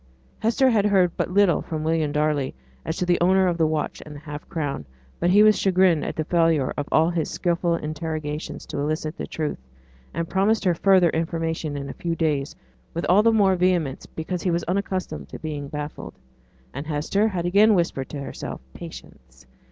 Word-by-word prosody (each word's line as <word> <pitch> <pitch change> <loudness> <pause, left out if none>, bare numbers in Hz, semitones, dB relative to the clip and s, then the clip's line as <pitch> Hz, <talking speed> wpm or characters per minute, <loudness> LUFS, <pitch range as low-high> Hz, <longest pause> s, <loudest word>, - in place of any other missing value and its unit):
Hester 235 +4 +2
had 210 -3 +3
heard 185 -4 +3
but - - -1
little 195 -2 +3
from 155 -1 -4
William 160 -2 +1
Darley 150 -2 0 0.3
as 160 - -3
to 180 - 0
the 175 -1 +2
owner 190 +2 +4
of 175 -2 0
the 160 - +4
watch 155 -1 -2
and 150 -1 -10
the - - -8
half 150 0 -9
crown; 145 - -3 0.4
but 175 - +2
he 205 +3 +6
was 215 0 +5
chagrined 185 -4 +3
at - - -4
the 155 - -1
failure 165 -4 +2
of 145 - -3
all 160 +2 +4
his 165 -3 -1
skilful 170 -1 0
interrogations 155 -1 -4
to - - -5
elicit 155 +2 -2
the - - -5
truth, 155 -2 -3 0.5
and 170 0 -3
promised 200 +5 +1
her 180 - +4
further 185 -1 +4
information 160 -2 -2
in 140 0 -5
a 135 - -6
few 170 -1 -3
days, 150 -4 -1 0.4
with 170 - -2
all 190 +4 +6
the 230 +1 +4
more 200 -4 +4
vehemence 175 -6 0
because 170 +2 -4
he 185 - 0
was 170 0 0
unaccustomed 190 0 -3
to - - -7
be 155 -2 -5
baffled. 150 +1 -6 0.6
And 140 +3 -6
Hester 160 +8 +1
had 180 -5 -2
again 205 +4 +5
whispered 170 -7 -1
to 145 - -5
herself 140 - -6
'Patience! 65 0 -12
165 Hz, 195 wpm, -24 LUFS, 150-185 Hz, 0.6 s, he